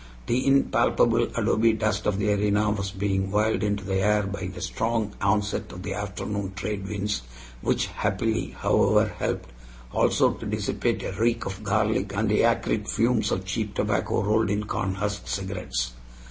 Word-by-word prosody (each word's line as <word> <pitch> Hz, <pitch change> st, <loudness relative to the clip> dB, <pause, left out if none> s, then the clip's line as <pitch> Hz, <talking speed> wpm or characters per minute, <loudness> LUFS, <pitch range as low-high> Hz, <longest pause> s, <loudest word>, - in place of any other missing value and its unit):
The 125 Hz, +3 st, 0 dB
impalpable 135 Hz, 0 st, +3 dB
adobe 115 Hz, +1 st, +3 dB
dust 110 Hz, -1 st, 0 dB
of 105 Hz, -2 st, +1 dB
the 105 Hz, 0 st, +2 dB
arena 105 Hz, +1 st, +2 dB
was 100 Hz, -1 st, -2 dB
being 95 Hz, -1 st, -1 dB
whirled 105 Hz, +2 st, +1 dB
into 105 Hz, -1 st, 0 dB
the 95 Hz, -1 st, -1 dB
air 105 Hz, +1 st, +3 dB
by 100 Hz, -2 st, -4 dB
the 95 Hz, -1 st, -7 dB
strong 110 Hz, +3 st, -1 dB
onset 100 Hz, +1 st, 0 dB
of 90 Hz, +1 st, -8 dB
the 95 Hz, 0 st, -3 dB
afternoon 100 Hz, 0 st, -4 dB
trade 100 Hz, 0 st, -3 dB
winds, 105 Hz, -2 st, -2 dB, 0.4 s
which -, -, +1 dB
happily, 110 Hz, +2 st, -1 dB
however, -, -, +3 dB
helped -, -, -2 dB, 0.4 s
also -, -, +3 dB
to -, -, -8 dB
dissipate -, -, -1 dB
a -, -, -3 dB
reek 115 Hz, +4 st, 0 dB
of 100 Hz, +2 st, -5 dB
garlic, 105 Hz, -1 st, +1 dB
and 105 Hz, +1 st, +1 dB
the 105 Hz, -, +3 dB
acrid 115 Hz, -2 st, +1 dB
fumes 115 Hz, 0 st, +2 dB
of 95 Hz, 0 st, -1 dB
cheap 105 Hz, +1 st, -3 dB
tobacco 100 Hz, -2 st, 0 dB
rolled 105 Hz, +1 st, +2 dB
in 105 Hz, +1 st, 0 dB
cornhusk 100 Hz, 0 st, -2 dB
cigarettes. 90 Hz, -11 st, -3 dB
105 Hz, 160 wpm, -26 LUFS, 95-110 Hz, 0.4 s, impalpable